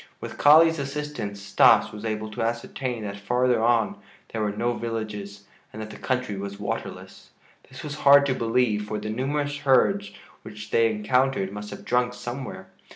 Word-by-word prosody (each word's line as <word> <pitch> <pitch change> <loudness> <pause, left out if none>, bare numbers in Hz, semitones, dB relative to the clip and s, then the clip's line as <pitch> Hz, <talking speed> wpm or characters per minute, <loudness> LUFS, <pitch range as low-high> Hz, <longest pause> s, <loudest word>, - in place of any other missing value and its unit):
With - - -8
Kali's 160 +2 +6
assistance 140 -7 -5
Stas 100 - +4
was 105 +1 -8
able 110 0 -3
to - - -5
ascertain 120 +1 -3
that 100 -1 -5
farther 125 +3 +1
on 115 -1 +2 0.3
there 110 - -4
were 105 -1 0
no 120 +4 -1
villages 105 -4 -5 0.3
and 110 - -9
that 110 0 -6
the - - -10
country 125 -5 -2
was 100 0 -6
waterless. - - -6 0.4
This - - -10
was 150 0 -6
hard 140 0 +6
to 135 - +1
believe, 115 -3 0
for 105 - -3
the 110 - -4
numerous 145 +4 -2
herds 145 +9 +2 0.3
which 105 -1 -10
they 115 0 +4
encountered 110 -1 0
must 105 +1 -7
have - - -10
drunk 125 0 +1
somewhere. 125 +2 -7
115 Hz, 170 wpm, -25 LUFS, 105-130 Hz, 0.4 s, Kali's